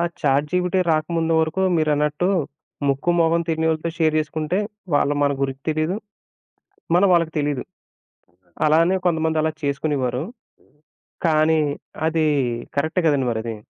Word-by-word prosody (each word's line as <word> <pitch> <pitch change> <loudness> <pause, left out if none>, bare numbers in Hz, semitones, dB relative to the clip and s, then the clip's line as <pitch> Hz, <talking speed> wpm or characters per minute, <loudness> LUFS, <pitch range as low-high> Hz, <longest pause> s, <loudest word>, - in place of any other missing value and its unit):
ఆ - - +2 0.2
చాట్‌జిపిటి 160 +6 +1
రాకముందు 165 +1 0
వరకు 160 +4 -1
మీరన్నట్టు 150 +2 +1 0.6
ముక్కు 140 +5 +1
మొహం 165 +1 +3
తెలీనోళ్ళతో 160 0 0
షేర్ 155 -2 +2
జేసుకుంటే 155 +3 -2 0.4
వాళ్ళు 145 0 +2
మన 140 0 +2
గురించి 135 0 -3
తెలీదు. 155 +5 -1 1.0
మనం 190 +3 +5
వాళ్ళకి 165 -2 +2
తెలీదు. 145 -3 -1 1.0
అలానే 165 +5 +3
కొంతమంది 160 -2 +1
అలా 160 - +1
చేసుకునేవారు. 140 -3 -1 1.0
కానీ 155 0 +3 0.5
అది 160 -1 +1 0.5
కరెక్టే 155 +5 +1
గదండీ 140 -4 +2
మరది. 115 0 -3
155 Hz, 115 wpm, -22 LUFS, 145-165 Hz, 1.0 s, మనం